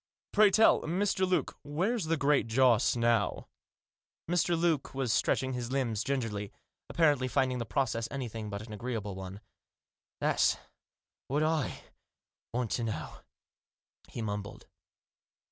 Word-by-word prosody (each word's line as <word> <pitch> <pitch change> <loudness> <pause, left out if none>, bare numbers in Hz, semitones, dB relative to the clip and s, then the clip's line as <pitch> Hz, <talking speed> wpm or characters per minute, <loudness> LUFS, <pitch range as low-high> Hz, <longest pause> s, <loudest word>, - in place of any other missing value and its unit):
Pray 210 -1 +6
tell 220 +3 +5
us, - - -5
Mr. 190 +1 +1
Luke, 180 - 0
where's 180 +9 -1
the 165 +1 +1
Great 145 -3 +2
Joss 120 0 +4
now? 115 -2 +1 0.4
" - - -68
Mr. 175 -1 +2
Luke 165 -6 0
was 130 -4 0
stretching 130 +1 +1
his 125 -1 -4
limbs, 120 -6 0
gingerly, 115 -7 -2 0.4
appa 170 - -1
rently 140 -5 +3
finding 130 0 +1
the 115 - -4
process 115 +1 0
anything 115 -5 -5
but 100 +1 -5
an 110 - -9
agreeable 105 -2 -4
one. 95 +2 -8 0.4
" - - -66
That's - - +2 0.3
— - - -64
what 145 +3 +1
I 155 -3 -1 0.3
— - - -65
want 120 -2 -2
to 120 - 0
know," 110 -2 -4 0.9
he 115 - -5
mumbled. 105 -1 -5
125 Hz, 150 wpm, -31 LUFS, 110-155 Hz, 0.9 s, Pray